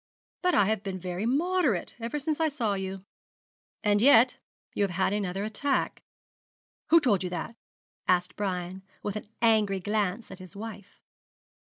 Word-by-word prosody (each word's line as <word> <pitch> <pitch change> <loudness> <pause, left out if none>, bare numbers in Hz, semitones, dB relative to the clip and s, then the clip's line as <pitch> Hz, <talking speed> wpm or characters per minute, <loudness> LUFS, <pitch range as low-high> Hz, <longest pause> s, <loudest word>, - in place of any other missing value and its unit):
But 360 -1 +2
I 205 - +5
have 215 0 0
been 195 -2 -4
very 180 +4 -3
moderate 300 - +1
ever 230 +5 -3
since 300 +2 -2
I 320 -1 +3
saw 240 -8 -1
you.' 190 0 -5 0.8
'And 205 -1 +3
yet 250 -1 +6 0.4
you - - +1
have 200 - +1
had 195 +1 +2
another 195 -1 -2
attack?' 260 +6 -1 0.9
'Who 335 - +8
told 210 - +2
you 180 - -2
that?' 180 +6 -5 0.5
asked 180 -1 +2
Brian, 185 -2 -3 0.2
with 205 - -3
an 215 - -6 0.2
angry 215 -4 +3
glance 205 +2 -1
at 190 - -9
his 185 +1 -12
wife. 205 -2 -9
205 Hz, 160 wpm, -28 LUFS, 190-235 Hz, 0.9 s, Who